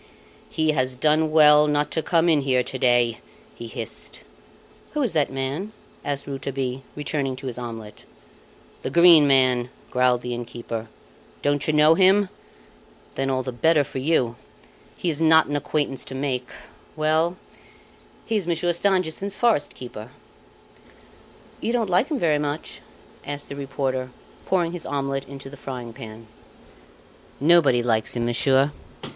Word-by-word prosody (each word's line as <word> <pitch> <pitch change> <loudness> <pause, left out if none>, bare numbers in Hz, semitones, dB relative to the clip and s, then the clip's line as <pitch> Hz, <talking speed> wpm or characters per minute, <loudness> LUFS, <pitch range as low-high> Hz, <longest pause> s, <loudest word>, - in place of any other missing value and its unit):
"He 155 -1 +1
has 130 -3 -1
done 155 +4 +2
well 150 -1 +6
not 150 0 0
to 160 - 0
come 165 +1 +2
in 155 -4 +4
here 130 -2 +1
to 130 - -6
day!" 120 -2 +2 0.3
he 115 - -9
hissed. - - -7 0.7
"Who 300 -1 0
is 235 - -1
that 150 -4 +1
man?" 135 +10 -4 0.3
asked 140 -1 -3
Rouletabille, 135 -1 -4
returning 140 -2 -2
to 135 +1 -10
his 125 -2 -4
omelette. 115 -3 -8 0.8
"The - - -3
Green 170 -3 +7
Man," 130 -3 +3 0.2
growled 125 -1 +2
the 125 0 -4
innkeeper. 120 -1 -6 0.6
"Don't 145 -1 +1
you 155 - +1
know 150 +1 +6
him? 190 +3 +4 0.8
Then 135 0 -2
all 130 -1 0
the 130 - -4
better 150 +5 +3
for 135 - -6
you. 130 -5 +1 0.6
He - - -4
is 155 +1 -5
not 160 0 +6
an 145 - -3
acquaintance 145 -1 -1
to 130 - -7
make. 130 -2 -2 0.5
Well, 160 +3 +1 0.9
he 225 - 0
is 190 -5 -3
Monsieur 175 +1 0
Stangerson's 190 +1 -1
forest 220 -12 +1
keeper." 120 -3 -9 1.5
"You 230 - -2
don't 245 - +2
appear - - -1
to 190 - -7
like 185 +9 +3
him 300 - -1
very 155 -6 +2
much?" 150 +1 -4 0.4
asked 145 0 -6
the 140 - -6
reporter, 135 -2 -3 0.4
pouring 175 -3 +1
his 175 -1 -5
omelette 135 -1 -2
into 135 0 -9
the 140 - -10
frying 125 -4 -7
pan. 115 -2 -10 1.1
"Nobody 145 -6 +4
likes 110 -1 0
him, 120 -1 -1
monsieur. 135 +4 +2
140 Hz, 155 wpm, -23 LUFS, 130-160 Hz, 1.5 s, Green